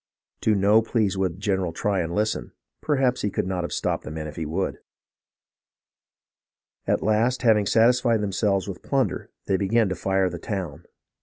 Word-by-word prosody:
To 110 - +3
no 100 +3 +4
pleas 110 -3 0
w^ould 95 -2 -1
General 95 -3 -1
Tryon 95 -2 -1
listen; 105 +1 -1 0.3
perhaps 135 -4 +1
he 105 - 0
could - - -2
not 90 -1 -2
have 85 - -4
stopped - - -1
the - - -7
men 75 0 -5
if 75 - -7
he 80 -2 -4
would. 90 +5 -2 2.1
At - - +1
last, 115 +5 +1
having 105 -4 +4
satisfied 115 0 +3
themselves 100 -1 0
with 95 -3 -6
plunder, 135 -2 -1 0.2
they 95 - +1
began 105 +2 +2
to 95 - -2
fire 95 0 +1
the 85 - -6
town. 90 -5 -5
100 Hz, 165 wpm, -24 LUFS, 95-110 Hz, 2.1 s, no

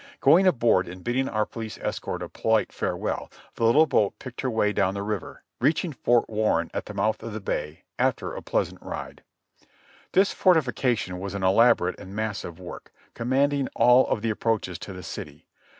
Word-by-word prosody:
Going 190 +3 +5
aboard 115 - +3
and 90 +1 -9
bidding 130 +3 0
our 110 0 0
police 110 -1 -7
escort - - -4
a - - -7
polite - - 0
farewell, - - -3 0.2
the 115 - -1
little 145 +8 +6
boat 105 -9 +1
picked 125 -2 -8
her 130 - -1
way 110 -3 +1
down 95 -1 +1
the 100 - -3
river, 105 -3 -5 0.2
reaching 160 +1 +1
Fort 120 -2 +2
Warren, 105 -6 0
at - - -4
the - - -8
mouth 110 0 0
of 115 - -6
the 110 - -4
Bay, 75 -6 -4 0.2
after - - 0
a - - -6
pleasant - - -2
ride. - - -7 0.9
This 195 +2 +4
fortification 125 - +1
was 100 +1 -5
an 100 - -3
elaborate 95 -1 +4
and 95 +2 -10
massive 105 -5 -4
work, 90 -1 -10 0.2
com 115 +1 -5
manding 140 +1 +2
all 125 +2 +5
of 105 - -1
the 115 - +1
approaches 105 -5 -1
to 100 - -8
the 90 0 -9
city. - - -8
110 Hz, 185 wpm, -25 LUFS, 95-125 Hz, 0.9 s, little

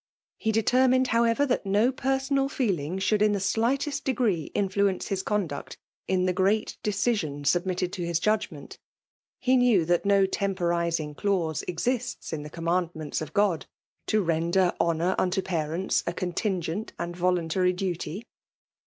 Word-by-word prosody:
He 220 - 0
determined, 255 +3 +3
however, 230 +4 +3
that 255 - 0
no 205 +5 +2
personal 270 +1 0
feeling 185 - -1
should 205 +2 +1
in 210 -1 +4
the 200 - 0
slightest 265 +9 0
degree 225 - 0
influence 200 -1 0
his 195 -1 -1
conduct 190 -8 -3 0.3
in 185 -1 +1
Ae 180 - +1
great 195 +4 +1
decision 200 -9 -1
submitted 180 +3 0
to 190 - -4
his 170 -1 0
judgment. 205 -8 -2 0.6
He 260 0 +2
knew 240 -9 +4
that 175 +1 +2
no 200 -1 +4
temporizing 170 -5 -1
clause 170 -3 -1
exists 240 +5 -2
in 155 - -3
the 150 - -8
commandments 165 -2 -2
of 155 - -6
God, 200 -5 +1 0.4
to 215 -1 +2
render 170 +2 +2
honour 170 +2 +1
unto 185 +1 +1
parents 170 +1 -1
a 175 - 0
contingent 185 +2 -2
and 170 0 -4
volun^ 180 -1 +1
tary 180 +3 +2
duty. 180 +2 -4
190 Hz, 145 wpm, -27 LUFS, 170-220 Hz, 0.6 s, in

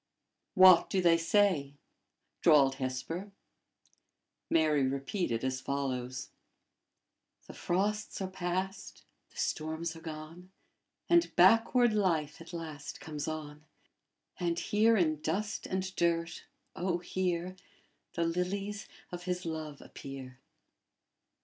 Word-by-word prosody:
"What 185 -2 +8
do 190 - +1
they 170 -2 +4
say?" 165 -6 +2 0.7
drawled 140 -4 +5
Hesper. 165 +10 -4 1.2
Mary 155 -4 +3
repeated 135 - -2
as 130 0 -1
follows: 130 -3 -3 1.1
"'The - - -11
frosts 205 +4 -1
are 190 - -2
past, 185 +1 -4 0.3
the - - -21
storms 160 +1 -2
are 165 - -11
gone, 160 +3 -9 0.6
And 345 0 +3
backward 225 +5 +5
life 165 -8 0
at 165 - -11
last 155 -4 -7
comes 150 -2 -5
on. 150 -1 -6 0.8
And 170 -1 0
here 220 +4 +3
in 155 -5 +1
dust 205 +8 -2
and 190 0 -3
dirt, 170 -1 0 0.3
O 175 0 0
here, 180 0 -2 0.6
The 170 - +1
Lilies 195 +5 -2 0.2
of 175 0 -7
His 180 -1 -2
love 155 -3 -5
appear!'" 135 -1 -9
170 Hz, 110 wpm, -31 LUFS, 150-185 Hz, 1.2 s, What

